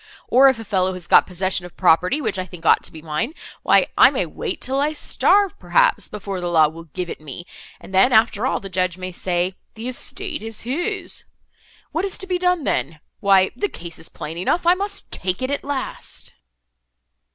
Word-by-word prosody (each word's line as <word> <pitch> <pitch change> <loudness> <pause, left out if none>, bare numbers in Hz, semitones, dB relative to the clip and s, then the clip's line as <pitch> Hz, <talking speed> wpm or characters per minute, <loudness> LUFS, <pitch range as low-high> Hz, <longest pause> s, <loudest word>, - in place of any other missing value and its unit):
Or, 265 +3 +6
if 265 - 0
a 225 - -8
fellow 190 -2 +1
has 180 -1 -7
got - - +5
possession 185 0 -1
of 175 -1 -12
property, 180 - +3
which 195 - -1
I 185 - -2
think 175 -3 -12
ought - - +5
to - - -8
be 160 -1 -11
mine, 165 - -2 0.3
why - - +4
I - - +8
may - - -1
wait, 440 -6 -5
till 265 +2 -2
I 295 +2 +1
starve, 395 +5 +2
perhaps, - - +2
before 200 -3 -5
the 175 - -2
law 160 -3 +5
will 165 +1 -11
give 180 +3 -5
it 165 - -7
me, 155 +3 -8 0.3
and 190 - -13
then, 195 +8 +5
after 225 +1 +3
all, - - 0
the 195 - -8
judge 185 -1 -1
may 185 0 -5
say—the 185 +6 -3
estate 335 +7 -4
is 225 -1 -6
his. 350 - -3 0.7
What 330 - -1
is 390 - -1
to 380 - -5
be 365 -1 -1
done 360 -3 +1
then?—Why 185 - +1
the 410 - -1
case 170 -1 -9
is - - -6
plain 160 +3 -7
enough, 335 - 0
I 350 - +7
must 400 +2 -4
take 185 +1 -2
it 260 - -1
at 285 - -2
last." 280 -2 -4
195 Hz, 205 wpm, -21 LUFS, 180-285 Hz, 0.7 s, I